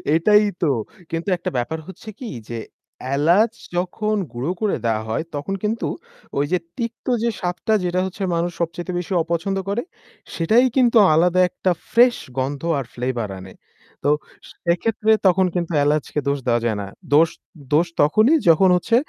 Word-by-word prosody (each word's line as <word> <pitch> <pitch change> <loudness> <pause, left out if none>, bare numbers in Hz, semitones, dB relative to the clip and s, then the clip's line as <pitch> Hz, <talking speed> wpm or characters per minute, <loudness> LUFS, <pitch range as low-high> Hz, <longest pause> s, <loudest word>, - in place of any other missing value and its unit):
এটাই 210 +6 +5 0.2
তো। 170 - +2 0.4
কিন্তু 165 +4 -2
একটা - - -3
ব্যাপার 125 +7 -2
হচ্ছে 190 +3 -10
কি? 245 - -6 0.2
যে 120 - -4 0.6
এলাচ 175 +10 +4 0.3
যখন 210 +4 -1 0.2
গুঁড়ো 125 +8 -3
করে 215 -2 +1
দেওয়া 110 -1 +1
হয় 110 - -1
তখন 145 +7 -3
কিন্তু 220 +2 -1 0.5
ওই 140 - +2
যে 180 - +3 0.2
তিক্ত 230 -2 -5 0.2
যে 235 - +2
স্বাদটা 180 +4 -1
যেটা 180 0 0
হচ্ছে 190 +2 -5
মানুষ 170 +1 0
সবচাইতে 170 +2 -3
বেশি 180 +2 -4
অপছন্দ 170 +4 -2
করে 210 +4 0 0.5
সেটাই 220 +9 +4
কিন্তু 245 -2 +4 0.2
আলাদা 175 +3 +3
একটা 185 - -1 0.2
ফ্রেশ 240 +1 +5 0.2
গন্ধ 135 +2 -2 0.2
আর 135 - -4
flavour 120 -3 -2
আনে। 95 0 -11 0.5
তো 145 - +2 0.6
সেক্ষেত্রে 215 +5 +1 0.2
তখন 185 +1 +4
কিন্তু 175 -1 -1
এলাচকে 150 0 0
দোষ 140 0 +1
দেওয়া 120 -1 +2
যায় 110 -3 0
না। 100 - -6 0.3
দোষ 160 +3 +6 0.4
দোষ 165 +4 +4
তখনই 215 - +4
যখন 175 +4 +6
হচ্ছে 230 +6 +1
175 Hz, 160 wpm, -21 LUFS, 145-210 Hz, 0.6 s, দোষ